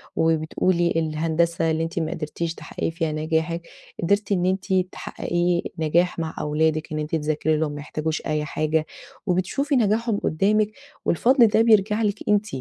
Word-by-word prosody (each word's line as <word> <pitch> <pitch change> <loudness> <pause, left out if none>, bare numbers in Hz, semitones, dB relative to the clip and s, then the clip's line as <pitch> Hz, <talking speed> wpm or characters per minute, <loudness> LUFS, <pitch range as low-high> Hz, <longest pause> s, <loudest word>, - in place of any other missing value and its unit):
وبتقولِي 165 +2 +1
الهندسة 165 +1 +1
اللي 160 +1 0
أنتِ 165 +2 -3
ما 160 - -2
قدرتيش 165 +2 -3
تحققي - - -4
فيها 165 -1 -2
نجاحِك، 160 +2 -1 0.4
قدرتِ 200 +3 +1
إن 180 -2 +2
أنتِ 190 +1 0 0.2
تحققي 175 0 -1 0.2
نجاح 170 +3 +2
مع 160 -1 -3
أولادِك، 155 +1 0
إن 155 - -2
أنتِ 150 +2 -2
تذاكري 155 0 0
لهم، 155 -1 0
ما 145 - -6
يحتاجوش 155 +1 -3
أي 150 0 -1
حاجة، 155 +1 0 0.4
وبتشوفي 200 - 0
نجاحهم 225 -1 +2
قدامِك، 210 +6 +1 0.3
والفضل 240 - +4
ده 220 +1 +3
بيرجع 215 -1 +4
لِك 205 -1 0
أنتِ. 210 0 +3
165 Hz, 150 wpm, -23 LUFS, 155-200 Hz, 0.4 s, والفضل